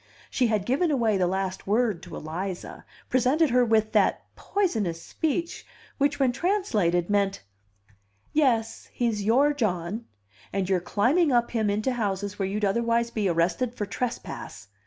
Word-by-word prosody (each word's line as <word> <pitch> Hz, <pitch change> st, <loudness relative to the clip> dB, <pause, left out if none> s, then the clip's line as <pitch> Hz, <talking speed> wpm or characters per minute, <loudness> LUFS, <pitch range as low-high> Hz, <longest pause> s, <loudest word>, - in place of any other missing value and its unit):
She 250 Hz, -, +2 dB
had 215 Hz, -3 st, 0 dB
given 285 Hz, -, +1 dB
away 235 Hz, -7 st, +2 dB
the 180 Hz, -1 st, +2 dB
last 190 Hz, +1 st, -3 dB
word 215 Hz, -4 st, +1 dB
to -, -, -9 dB
Eliza, 175 Hz, +4 st, -6 dB, 0.2 s
presented 260 Hz, +4 st, +2 dB
her 250 Hz, 0 st, +4 dB
with 220 Hz, -2 st, +2 dB
that -, -, +2 dB
poisonous 220 Hz, -, -1 dB
speech 330 Hz, -, -3 dB, 0.4 s
which 285 Hz, +1 st, +1 dB
when 265 Hz, -2 st, +3 dB
translated 230 Hz, -, +1 dB
meant: 200 Hz, -, 0 dB, 0.9 s
"Yes, 240 Hz, -7 st, +1 dB
he's 230 Hz, -4 st, 0 dB
'your' 270 Hz, +8 st, +4 dB
John; 210 Hz, -3 st, -2 dB, 0.5 s
and 195 Hz, -2 st, -1 dB
you're 190 Hz, -1 st, +2 dB
climbing 270 Hz, -, +2 dB
up 240 Hz, -1 st, +2 dB
him 220 Hz, -3 st, 0 dB
into 215 Hz, +5 st, 0 dB
houses 205 Hz, -3 st, -2 dB
where 195 Hz, -, 0 dB
you'd 205 Hz, +2 st, -1 dB
otherwise 235 Hz, +3 st, +1 dB
be 210 Hz, -4 st, 0 dB
arrested 175 Hz, +9 st, 0 dB
for 210 Hz, -, -2 dB
trespass." 205 Hz, -, -5 dB
220 Hz, 150 wpm, -26 LUFS, 195-250 Hz, 0.9 s, her